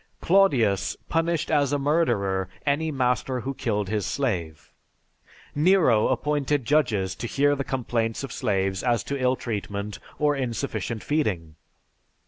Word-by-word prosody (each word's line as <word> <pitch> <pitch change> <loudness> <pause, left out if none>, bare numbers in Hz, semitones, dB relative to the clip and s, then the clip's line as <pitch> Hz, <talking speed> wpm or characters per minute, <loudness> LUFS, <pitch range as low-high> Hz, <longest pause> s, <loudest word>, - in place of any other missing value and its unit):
Claudius 135 - +3
punished 165 -1 0
as 145 -3 +2
a 145 - +2
murderer 120 - +1 0.2
any 150 +3 +1
master 125 -1 0
who 135 +3 -3
killed 105 -6 -2
his 105 0 -1
slave. 85 - -3 0.8
Nero 150 - +4
appointed 145 0 0
judges 115 -11 +1
to 120 - -5
hear 145 +4 +2
the 140 - -2
complaints 120 -3 -2
of 135 - -5
slaves 95 -5 0
as 120 -3 +1
to 140 -1 -4
ill 130 0 +3
treatment 105 -3 -4 0.2
or 150 -1 +2
insufficient 115 -4 -3
feeding. 95 - -1
125 Hz, 130 wpm, -25 LUFS, 105-145 Hz, 0.8 s, Nero